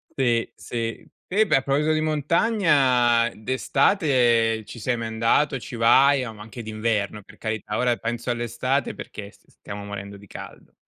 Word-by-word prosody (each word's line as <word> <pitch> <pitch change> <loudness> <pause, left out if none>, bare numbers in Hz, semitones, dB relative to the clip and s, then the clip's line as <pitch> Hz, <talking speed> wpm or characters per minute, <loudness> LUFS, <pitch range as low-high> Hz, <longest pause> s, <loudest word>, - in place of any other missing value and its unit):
Sì, 120 -4 +1
sì. 115 +7 -5 0.2
Eh 215 +4 +4
beh, 195 - +3
a - - +1
proposito 145 +3 +1
di 155 - +1
montagna, 145 - +3
d'estate 125 - +2
ci 120 - -10
sei 120 +2 -1
mai 115 -1 -4
andato, 115 +5 +1
ci 120 - -8
vai? 130 +4 +5
Oh, 115 - -7
ma 105 - -13
anche 115 +3 -9
d'inverno, 110 -1 -2
per 105 +2 -17
carità, 110 -1 -3
ora 125 -1 +2
penso 120 +1 -4
all'estate 120 +3 -1
perché 100 -1 -8
s - - -26
stiamo 100 0 -9
morendo 100 0 -7
di 100 - -15
caldo. - - -11
120 Hz, 165 wpm, -24 LUFS, 110-135 Hz, 0.2 s, vai